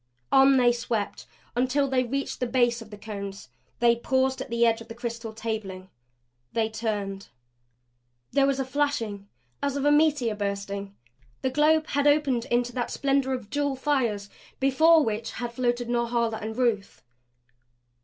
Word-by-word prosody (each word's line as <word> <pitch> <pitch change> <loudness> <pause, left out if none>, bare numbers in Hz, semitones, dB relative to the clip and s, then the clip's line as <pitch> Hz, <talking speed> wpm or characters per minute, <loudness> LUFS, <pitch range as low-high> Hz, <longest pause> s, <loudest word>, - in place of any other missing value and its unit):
On 270 0 +6
they 245 -1 +5
swept 235 -3 -3 0.3
until 260 +3 +2
they 260 -1 +2
reached 275 +3 -3
the 250 - -1
base 240 -1 +2
of 225 - -11
the 210 - -10
Cones. 200 -7 -7 0.3
They 235 0 +4
paused 260 +2 0
at - - -6
the 235 0 +2
edge 230 0 +2
of 225 - -11
the 230 - -9
crystal 235 -1 -5
tabling. 215 -4 -5 0.6
They 225 -1 +1
turned. 205 -3 -3 1.0
There 275 -1 +3
was 275 -1 0
a 270 - 0
flashing 235 -8 -2 0.3
as 280 -1 -1
of 280 - -1
a 290 - +5
meteor 295 -6 +3
bursting. 200 -1 -4 0.5
The 260 - +1
globe 310 +3 +3
had 285 +1 +1
opened 285 -5 +2
into 240 0 0
that 245 -2 -2
splendor 275 -1 +1
of 245 -5 -6
jewel 285 -1 0
fires 255 -7 0 0.3
before 310 +4 +5
which 220 +1 -3
had 240 -1 -5
floated 240 -1 0
Norhala 235 -1 0
and 220 +2 -5
Ruth. 230 -6 -1
240 Hz, 160 wpm, -26 LUFS, 220-270 Hz, 1.0 s, On